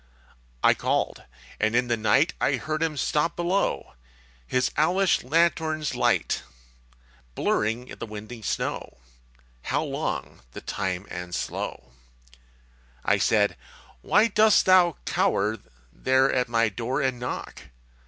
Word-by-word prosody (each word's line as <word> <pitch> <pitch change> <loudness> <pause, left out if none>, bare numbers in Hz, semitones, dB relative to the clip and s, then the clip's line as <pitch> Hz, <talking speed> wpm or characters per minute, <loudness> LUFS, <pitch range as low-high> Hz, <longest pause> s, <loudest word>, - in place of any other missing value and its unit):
I - - +6
called. - - -1 0.3
And 110 +2 +1
in 125 0 +2
the 120 - +1
night 115 +10 +2
I 140 - +2
heard 155 +4 -3
him 160 -2 -1
stop 150 +4 0
below, 175 +3 -1 0.5
His 130 0 +1
owlish 180 +4 +2
lanthorn's 155 +1 +1
light - - +1 0.9
Blurring 115 +4 0
the 115 - -8
windy 110 +2 -8
snow 105 - -3 0.6
How - - -1
long - - -4
the - - -8
time 95 -1 -3
and 90 0 -5
slow! 65 - -5 1.1
I - - +3
said, 105 -1 +2 0.5
_Why 210 +1 +3
dost 215 -1 +5
thou 180 -3 +5
cower 110 - +1 0.3
There 130 +1 +2
at 125 -2 0
my 115 -1 +3
door 120 +6 -2
and 130 -3 -1
knock? 125 - -6
130 Hz, 125 wpm, -25 LUFS, 110-165 Hz, 1.1 s, I